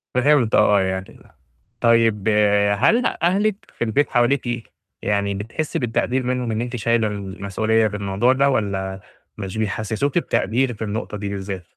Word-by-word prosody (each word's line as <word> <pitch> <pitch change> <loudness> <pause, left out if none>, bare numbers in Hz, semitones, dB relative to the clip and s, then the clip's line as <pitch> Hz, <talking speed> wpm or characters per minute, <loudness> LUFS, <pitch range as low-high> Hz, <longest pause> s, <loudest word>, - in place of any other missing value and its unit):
فهمت، 125 -3 +3
آه 100 -1 +4
يعني، 95 0 -4 0.6
طيب 115 -3 +3 0.5
هل 230 - +3
أهلِك 195 +4 +1 0.2
في - - -1
البيت 120 +6 +1
حواليكِ، 120 -1 0 0.3
يعني 100 -1 0
بتحسي 110 +10 -3
بالتقدير 125 +2 0
منهم، 125 -1 -1
إن 110 +1 -1
أنتِ 120 0 -4
شايلة 115 -1 +1
المسؤولية 105 +2 -1
في 105 - -5
الموضوع 100 +5 +1
ده 140 +1 +3
والَّا 95 -5 -2 0.4
مش 95 +1 -6
بيحسّسوكِ 110 - -1
بتقدير 125 - 0
في 110 0 -6
النقطة 105 0 -4
دي 100 0 -4
بالذات؟ 95 -2 -5
110 Hz, 145 wpm, -21 LUFS, 100-125 Hz, 0.6 s, آه